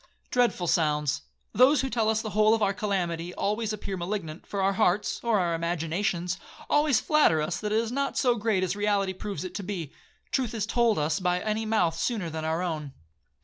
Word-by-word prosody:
Dreadful 240 -7 +2
sounds!—Those 160 - +2
who 265 - -2
tell 225 -2 +1
us 220 0 +1
the 215 - -4
whole 215 +2 +4
of 220 - -1
our 200 -1 +2
calamity 180 -4 -2
always 215 +2 -1
appear 200 -2 -4
malignant, 175 -3 -5
for 200 - -4
our 195 +1 +3
hearts, 200 0 +1
or 230 -2 +2
our 175 -3 +1
imaginations, 170 +2 -1 0.3
always 295 -5 +4
flatter 300 - +3
us 160 +3 -2
that 210 -1 -3
it 215 - +2
is 230 0 0
not 275 +2 -1
so 250 -2 +3
great 215 -4 0
as 185 - -1
reality 205 -2 +1
proves 195 0 -5
it 185 -1 -6
to 205 - -4
be. 180 -6 -5 0.4
Truth 250 -4 -1
is 210 -3 -1
told 230 0 +2
us 150 +3 0
by 180 -1 +1
any 215 +2 -2
mouth 180 -7 +2
sooner 195 -3 -2
than 160 0 -4
our 160 +3 -1
own. 155 -5 -4
195 Hz, 200 wpm, -27 LUFS, 170-220 Hz, 0.4 s, whole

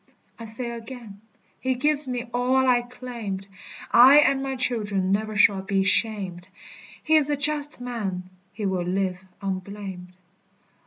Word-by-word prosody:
I 230 - -7
say 235 +2 -5
again, 230 -3 -10 0.4
he 260 0 -1
gives 295 +2 +1
me 250 -2 -3
all 255 +2 +2
I 245 -1 +4
claimed, 240 -6 -7 0.5
I 255 +4 +8
and 275 -2 +4
my 270 0 -3
children 210 -7 -1
never 215 +2 -1
shall 200 -1 +4
be 195 0 0
shamed: 190 -3 +1 0.6
He 315 0 +4
is 295 -2 +5
a 290 - 0
just 295 0 0
man, 215 -7 -4 0.3
he 210 - -5
will 190 -2 0
live 185 0 -2 0.2
unblamed. 190 -1 -6
225 Hz, 145 wpm, -24 LUFS, 195-255 Hz, 0.6 s, I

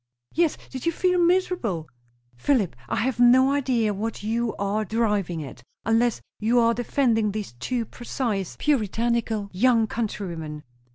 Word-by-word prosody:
"Yes. 335 -2 +2
Did 260 +3 -5
you - - +4
feel 360 +2 +1
miserable?" 340 - +1 0.5
"Philip, 205 - +1
I - - 0
have 245 +1 -1
no 255 +2 +6
idea 255 -6 +1
what 215 +2 -4
you 230 +1 -1
are 200 +2 -1
driving 210 -7 0
at, 130 -3 -10 0.2
unless 225 +1 +2 0.2
you 225 +3 +2
are 230 0 +4
defending 230 -2 +1
these 210 - -5
two 245 -3 -1
precise, 225 -5 -3
puritanical 230 -5 0
young 230 +3 +4
country 215 -2 -3
women." 155 -3 -6
225 Hz, 145 wpm, -25 LUFS, 205-255 Hz, 0.5 s, no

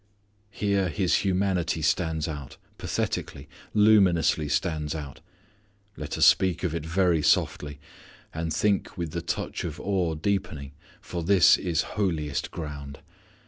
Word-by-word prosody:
Here 100 -3 0
His 90 +2 +1
humanity 90 -4 0
stands 80 -1 0
out, 75 -4 -7 0.2
pathetically, 70 +2 -3 0.3
luminously 95 -8 +4
stands 75 -1 -1
out. 75 -4 -7 0.7
Let 75 -1 -5
us - - +5
speak 95 -3 +4
of 90 -4 -1
it 85 -2 -3
very 85 0 +2
softly 75 -1 +1 0.5
and 80 0 -3
think 100 +6 0
with 85 -3 -3
the 85 - -3
touch 85 - -3
of 80 -2 -5
awe 90 -5 -1
deepening 80 -5 -2 0.3
for 85 - -5
this 90 -1 +6
is 85 -3 0
holiest 80 -8 -2
ground. 70 -3 -7
85 Hz, 130 wpm, -26 LUFS, 75-95 Hz, 0.7 s, this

